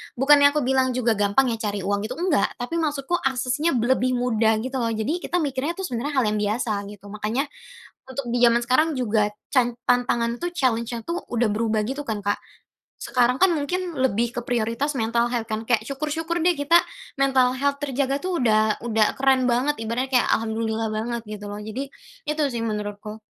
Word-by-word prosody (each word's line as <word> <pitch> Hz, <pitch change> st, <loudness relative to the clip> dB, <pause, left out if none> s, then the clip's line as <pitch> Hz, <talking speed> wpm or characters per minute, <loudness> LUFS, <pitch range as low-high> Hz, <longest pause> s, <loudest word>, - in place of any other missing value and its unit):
bukannya 285 Hz, +2 st, +5 dB
aku 300 Hz, -, +1 dB
bilang 260 Hz, 0 st, +1 dB
juga 230 Hz, -4 st, +1 dB
gampang 205 Hz, +6 st, +3 dB
ya 225 Hz, -, -3 dB
cari 205 Hz, -2 st, -3 dB
uang 200 Hz, +2 st, -1 dB
itu, 250 Hz, -, -6 dB
enggak. 340 Hz, -1 st, +2 dB
Tapi 260 Hz, +8 st, -3 dB
maksudku 300 Hz, +2 st, -1 dB
aksesnya 265 Hz, +4 st, 0 dB
lebih 255 Hz, +1 st, +2 dB
mudah 225 Hz, -3 st, +2 dB
gitu 260 Hz, +1 st, -3 dB
loh, 235 Hz, -, 0 dB
jadi 225 Hz, +10 st, -1 dB
kita 355 Hz, -1 st, -1 dB
mikirnya 285 Hz, +4 st, -2 dB
tuh 385 Hz, -, -5 dB
sebenarnya 280 Hz, -1 st, -3 dB
hal 260 Hz, -, +3 dB
yang 210 Hz, -, -1 dB
biasa, 215 Hz, +3 st, -1 dB, 0.2 s
gitu. 205 Hz, -1 st, -12 dB
Makanya, 215 Hz, +5 st, -1 dB, 0.7 s
untuk 260 Hz, 0 st, -4 dB
di -, -, +2 dB
zaman 235 Hz, -1 st, +6 dB
sekarang 255 Hz, +6 st, +3 dB
juga, 215 Hz, -4 st, +1 dB, 0.2 s
can 245 Hz, -2 st, +3 dB
tantangan 240 Hz, -1 st, +1 dB
tuh, 350 Hz, -, -1 dB
challenge-nya 235 Hz, -5 st, 0 dB
tuh 340 Hz, +2 st, -3 dB
udah 240 Hz, 0 st, +1 dB
berubah 215 Hz, 0 st, 0 dB
gitu 275 Hz, +4 st, -3 dB
kan, 220 Hz, -3 st, -2 dB
Kak. 205 Hz, +1 st, 0 dB, 0.6 s
Sekarang 250 Hz, 0 st, +2 dB
kan 375 Hz, -2 st, +5 dB
mungkin 350 Hz, +3 st, -3 dB
lebih 240 Hz, -3 st, 0 dB
ke -, -, 0 dB
prioritas 240 Hz, +5 st, -1 dB
mental 235 Hz, +1 st, +1 dB
health 235 Hz, -2 st, -2 dB
kan. 215 Hz, 0 st, -2 dB
Kayak 230 Hz, -3 st, +2 dB
syukur-syukur 310 Hz, +4 st, -2 dB
deh 355 Hz, -, +5 dB
kita 285 Hz, +4 st, +4 dB, 0.4 s
mental 260 Hz, -2 st, +3 dB
health 280 Hz, +1 st, 0 dB
terjaga 275 Hz, 0 st, 0 dB
tuh 370 Hz, -1 st, -1 dB
udah 215 Hz, -2 st, +3 dB
udah 220 Hz, -2 st, +2 dB
keren 265 Hz, -1 st, +3 dB
banget 255 Hz, +5 st, +1 dB
ibaratnya, 235 Hz, +4 st, -2 dB
kayak -, -, -1 dB
Alhamdulillah 220 Hz, 0 st, -2 dB
banget, 230 Hz, +2 st, -3 dB
gitu 210 Hz, -1 st, -7 dB
loh. 205 Hz, -, -5 dB
Jadi, 225 Hz, +6 st, -5 dB, 0.4 s
itu 300 Hz, +1 st, 0 dB
sih 235 Hz, -, -3 dB
menurutku. 210 Hz, 0 st, -5 dB
245 Hz, 190 wpm, -24 LUFS, 220-275 Hz, 0.7 s, zaman